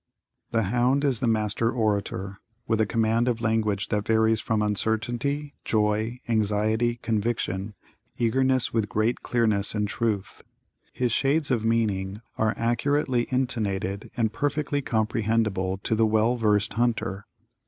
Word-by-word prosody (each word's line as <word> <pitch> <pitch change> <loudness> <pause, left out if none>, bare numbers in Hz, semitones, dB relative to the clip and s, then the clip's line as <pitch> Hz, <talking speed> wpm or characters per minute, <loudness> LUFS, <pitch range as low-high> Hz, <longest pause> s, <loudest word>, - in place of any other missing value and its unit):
The 115 -1 +1
hound 125 +7 +2
is 130 -5 +1
the 125 - 0
master 110 0 +1
orator, 100 -4 -2 0.3
with 110 -1 +2
a 110 - +2
command 115 +2 +1
of 120 -2 0
language 110 -2 0
that 105 -2 0
varies 110 -1 +3
from 110 -1 0
uncertainty, 120 +8 -1
joy, 110 +2 0
anxiety, 110 +1 +1
conviction, 110 -3 -2 0.4
eagerness 130 +2 +1
with 110 -3 0
great 110 +3 0
clearness 110 -4 0
and 105 -1 0
truth. 105 -3 -2 0.5
His 125 -2 -1
shades 140 +4 +1
of 115 -3 +1
meaning 105 -4 0 0.2
are 110 -1 +1
accurately 125 +1 +1
intonated 105 -7 -2
and 110 -2 +1
perfectly 145 +2 -1
comprehendible 110 -5 0
to - - 0
the 110 0 +3
well 110 +3 +2
versed 105 -3 +1
hunter. 110 -4 -1
110 Hz, 130 wpm, -26 LUFS, 105-120 Hz, 0.5 s, varies